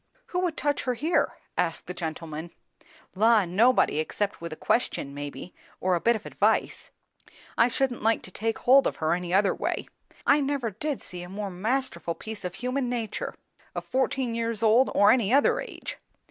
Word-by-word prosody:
"Who 360 Hz, -, +1 dB
would 355 Hz, -3 st, -1 dB
touch 290 Hz, -1 st, 0 dB
her, 250 Hz, -1 st, 0 dB
here?" 315 Hz, +8 st, +1 dB, 0.2 s
asked 165 Hz, -2 st, 0 dB
the 180 Hz, -, -6 dB
gentleman. 160 Hz, -1 st, -5 dB, 0.6 s
"La! 220 Hz, +1 st, +4 dB
nobody, 200 Hz, -2 st, +3 dB
except 200 Hz, +6 st, -2 dB
with 170 Hz, -1 st, -5 dB
a -, -, -5 dB
question 150 Hz, -, 0 dB
maybe, 145 Hz, +5 st, -7 dB, 0.3 s
or 185 Hz, 0 st, +1 dB
a 170 Hz, -, +1 dB
bit 235 Hz, 0 st, +4 dB
of 220 Hz, -, -6 dB
advice. -, -, 0 dB, 0.7 s
I 235 Hz, -, +5 dB
shouldn't 250 Hz, 0 st, -1 dB
like 225 Hz, +1 st, +2 dB
to 185 Hz, -, -7 dB
take 225 Hz, +4 st, -2 dB
hold 270 Hz, +2 st, +5 dB
of -, -, -2 dB
her 160 Hz, +1 st, 0 dB
any 175 Hz, 0 st, -3 dB
other 195 Hz, +1 st, +4 dB
way. -, -, -3 dB, 0.4 s
I 290 Hz, +1 st, +5 dB
never 275 Hz, -5 st, -1 dB
did 280 Hz, +8 st, -3 dB
see 180 Hz, -1 st, -7 dB
a 175 Hz, -, -8 dB
more 200 Hz, +1 st, -4 dB
masterful 220 Hz, -1 st, -1 dB
piece 220 Hz, -2 st, -7 dB
of 180 Hz, 0 st, -4 dB
human 250 Hz, +4 st, -2 dB
nature, 230 Hz, -4 st, -3 dB, 0.4 s
of -, -, -4 dB
fourteen 260 Hz, -2 st, 0 dB
years 230 Hz, -1 st, -2 dB
old 230 Hz, +4 st, +5 dB
or 205 Hz, 0 st, +7 dB
any 235 Hz, -4 st, +2 dB
other 280 Hz, +2 st, +4 dB
age. -, -, -7 dB
220 Hz, 185 wpm, -27 LUFS, 180-255 Hz, 0.7 s, or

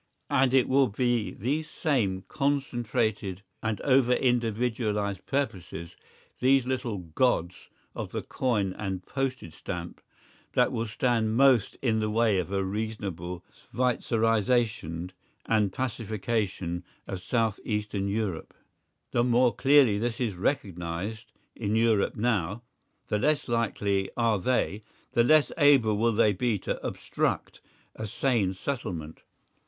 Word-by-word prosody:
And 135 Hz, -2 st, +4 dB
it 130 Hz, -1 st, +4 dB
will 135 Hz, 0 st, +4 dB
be 120 Hz, 0 st, 0 dB
these 145 Hz, +9 st, -2 dB
same 105 Hz, -, 0 dB
concentrated 120 Hz, -9 st, -1 dB, 0.2 s
and 110 Hz, -3 st, -2 dB
over 130 Hz, -2 st, +4 dB
individualised 115 Hz, -4 st, 0 dB
purposes, 95 Hz, -, -3 dB, 0.4 s
these 130 Hz, 0 st, +4 dB
little 125 Hz, -4 st, -2 dB
gods 90 Hz, +1 st, -1 dB, 0.2 s
of -, -, -5 dB
the -, -, -3 dB
coin 105 Hz, -7 st, 0 dB
and 95 Hz, -3 st, -4 dB
postage 130 Hz, -, -3 dB
stamp -, -, -6 dB, 0.5 s
that -, -, +3 dB
will 115 Hz, 0 st, -2 dB
stand 115 Hz, -1 st, +1 dB
most 130 Hz, -6 st, +4 dB
in 110 Hz, -4 st, +2 dB
the 110 Hz, 0 st, 0 dB
way 110 Hz, -3 st, +2 dB
of 90 Hz, +1 st, -3 dB
a 100 Hz, -1 st, 0 dB
reasonable 95 Hz, -4 st, -4 dB, 0.3 s
Schweitzerisation 115 Hz, -7 st, +1 dB, 0.4 s
and 105 Hz, -3 st, +2 dB
pacification 105 Hz, -6 st, -2 dB, 0.2 s
of 95 Hz, -2 st, -5 dB
south 110 Hz, +2 st, 0 dB
eastern 105 Hz, -2 st, -2 dB
Europe. 100 Hz, -5 st, -3 dB, 0.6 s
The 120 Hz, -, +2 dB
more 125 Hz, 0 st, +3 dB
clearly 135 Hz, -7 st, +5 dB
this 120 Hz, +1 st, -2 dB
is 120 Hz, -5 st, 0 dB
recognised 100 Hz, -, -3 dB, 0.2 s
in 105 Hz, -1 st, -1 dB
Europe 110 Hz, -3 st, +2 dB
now, 105 Hz, -2 st, 0 dB, 0.5 s
the 105 Hz, -, +1 dB
less 150 Hz, +4 st, +1 dB
likely 100 Hz, -5 st, 0 dB
are 115 Hz, -3 st, +2 dB
they, 110 Hz, -1 st, 0 dB, 0.3 s
the 120 Hz, -, +4 dB
less 155 Hz, +4 st, +5 dB
able 135 Hz, -7 st, +5 dB
will 115 Hz, +2 st, +2 dB
they 105 Hz, -1 st, +4 dB
be 115 Hz, +2 st, 0 dB
to -, -, -4 dB
obstruct -, -, -2 dB, 0.3 s
a 110 Hz, -, -5 dB
sane 110 Hz, -4 st, 0 dB
settlement. 90 Hz, -, -5 dB
110 Hz, 125 wpm, -28 LUFS, 100-125 Hz, 0.6 s, clearly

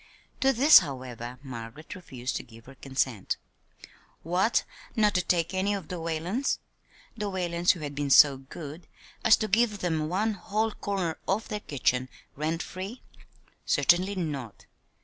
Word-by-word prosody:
To 270 Hz, -, +4 dB
this, 270 Hz, +5 st, +8 dB
however, 125 Hz, -, -6 dB
Margaret 125 Hz, +3 st, -8 dB
refused 135 Hz, -8 st, -5 dB
to -, -, -6 dB
give 115 Hz, 0 st, -16 dB
her 135 Hz, -, -12 dB
consent. 130 Hz, -6 st, -2 dB, 0.9 s
What, 180 Hz, +7 st, +2 dB, 0.3 s
not 210 Hz, -2 st, +3 dB
take 170 Hz, 0 st, +1 dB
any 195 Hz, +2 st, +1 dB
of 190 Hz, -6 st, -7 dB
the 180 Hz, -, -4 dB
Whalens 165 Hz, -, -1 dB, 0.6 s
the 210 Hz, -3 st, -3 dB
Whalens 175 Hz, -2 st, +1 dB
who 170 Hz, -, -10 dB
had 145 Hz, -1 st, -4 dB
been 145 Hz, 0 st, -2 dB
so 140 Hz, 0 st, +7 dB
good 150 Hz, +4 st, -9 dB, 0.4 s
as 220 Hz, -, +7 dB
to 215 Hz, -, -1 dB
give 215 Hz, 0 st, +2 dB
them 160 Hz, -5 st, -1 dB
one 210 Hz, +5 st, +1 dB
whole 215 Hz, +3 st, -1 dB
corner 190 Hz, -6 st, -3 dB
of 215 Hz, +4 st, 0 dB
their 210 Hz, -2 st, -2 dB
kitchen, 130 Hz, -6 st, 0 dB, 0.3 s
rent 160 Hz, +3 st, -1 dB
free? 195 Hz, +7 st, -7 dB, 0.6 s
Certainly 185 Hz, +3 st, +3 dB
not! 140 Hz, -, -4 dB
170 Hz, 150 wpm, -28 LUFS, 140-200 Hz, 0.9 s, this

